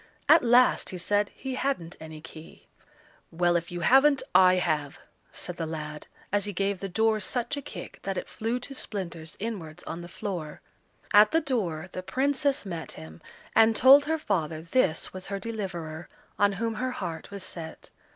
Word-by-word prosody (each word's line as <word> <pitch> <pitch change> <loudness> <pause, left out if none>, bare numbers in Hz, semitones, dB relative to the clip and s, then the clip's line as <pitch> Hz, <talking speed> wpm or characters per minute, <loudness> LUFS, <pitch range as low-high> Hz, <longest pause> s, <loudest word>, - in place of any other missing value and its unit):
At 320 +1 +7
last 245 +1 +4
he 185 - -5
said 205 +3 +1
he 265 -1 -6
hadn't 255 -11 -2
any 155 -1 -9
key. 160 0 -13 0.6
"Well, 175 +1 +1
if 170 0 -1
you 175 0 -4
haven't, 270 - +5
I 185 -1 +7
have," 150 -5 -1 0.3
said 180 -1 -6
the 165 - -3
lad, 150 -1 -6 0.2
as 205 0 +1
he 205 - -4
gave 195 +1 -1
the 195 - -4
door 220 +3 +2
such 240 +7 -1
a 285 - -4
kick 185 -9 -9
that 195 -1 -3
it - - -4
flew 225 +3 -2
to 275 - -6
splinters 170 -10 -6
inwards 195 -8 -5
on 170 - -6
the 175 - -8
floor. 175 -6 -5 0.5
At 210 +1 +8
the 325 - +3
door 190 - -2
the 185 - -5
Princess 275 +6 0
met 170 -4 -5
him, 80 0 -11 0.3
and 225 0 +6
told 275 +4 +8
her 320 +2 0
father 160 - -2
this 170 -3 +1
was 185 0 -6
her 200 - -3
deliverer, 185 -7 -5 0.3
on 200 0 +4
whom 225 +4 -2
her 255 0 -1
heart 170 -8 -5
was 200 -2 -5
set. 165 -3 -7
190 Hz, 180 wpm, -27 LUFS, 165-230 Hz, 0.6 s, At